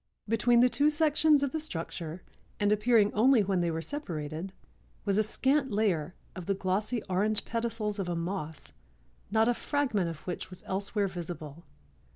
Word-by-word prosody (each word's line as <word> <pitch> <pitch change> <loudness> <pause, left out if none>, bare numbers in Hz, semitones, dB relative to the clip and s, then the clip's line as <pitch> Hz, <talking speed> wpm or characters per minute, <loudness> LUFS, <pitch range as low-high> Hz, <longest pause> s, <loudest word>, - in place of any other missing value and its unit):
Between 235 +2 +4
the 250 - +7
two 280 +6 +3
sections 305 -1 +4
of 280 - 0
the 315 - -2
structure 170 - -5 0.4
and 205 0 +2
appearing 210 0 +4
only 235 +1 +5
when 190 -2 +1
they 170 - +1
were 165 0 -3
separated, 170 - -4 0.5
was 200 +1 +2
a - - +6
scant 265 +6 +1
layer 185 -6 0 0.2
of 180 -3 -7
the 195 - +1
glossy 205 +5 -1
orange 205 +3 0
pedicels 225 -3 -2
of 185 -2 -2
a 175 - -1
moss 165 -4 -4 0.6
not 220 +2 +3
a 245 - +4
fragment 235 -10 0
of 165 -2 -7
which 180 - -4
was 185 -1 -9
elsewhere 200 +1 -1
visible. 170 -3 -7
205 Hz, 170 wpm, -30 LUFS, 175-235 Hz, 0.6 s, the